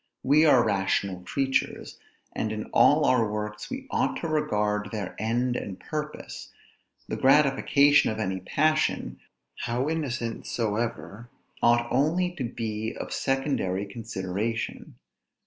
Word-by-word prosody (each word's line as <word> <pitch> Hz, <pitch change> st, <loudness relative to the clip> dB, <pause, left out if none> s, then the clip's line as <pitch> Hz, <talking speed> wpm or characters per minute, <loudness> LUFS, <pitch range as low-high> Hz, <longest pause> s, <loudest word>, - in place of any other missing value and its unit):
We 150 Hz, +4 st, +5 dB
are 130 Hz, -5 st, +6 dB
rational 95 Hz, -2 st, 0 dB
creatures, 135 Hz, +8 st, -2 dB, 0.3 s
and 110 Hz, -, -2 dB
in 110 Hz, 0 st, -3 dB
all 150 Hz, 0 st, +5 dB
our 115 Hz, -5 st, +3 dB
works 105 Hz, 0 st, -5 dB
we 265 Hz, 0 st, -5 dB
ought -, -, +1 dB
to 165 Hz, -, -2 dB
regard 105 Hz, -9 st, 0 dB
their 105 Hz, -4 st, -5 dB
end 120 Hz, +3 st, 0 dB
and 95 Hz, -5 st, -5 dB
purpose; 150 Hz, -, -6 dB, 0.6 s
the -, -, -3 dB
gratification 140 Hz, +1 st, +4 dB
of 110 Hz, -, -3 dB
any 95 Hz, -3 st, -2 dB
passion, 155 Hz, +11 st, 0 dB, 0.4 s
how 120 Hz, +4 st, -1 dB
innocent 125 Hz, -8 st, -3 dB
soever, 115 Hz, 0 st, -3 dB, 0.3 s
ought 120 Hz, 0 st, +4 dB
only 160 Hz, +8 st, +2 dB
to 135 Hz, -, -2 dB
be 110 Hz, -2 st, -4 dB
of -, -, -5 dB
secondary 135 Hz, -8 st, -1 dB
consideration. 105 Hz, -, -4 dB
115 Hz, 125 wpm, -27 LUFS, 105-140 Hz, 0.6 s, are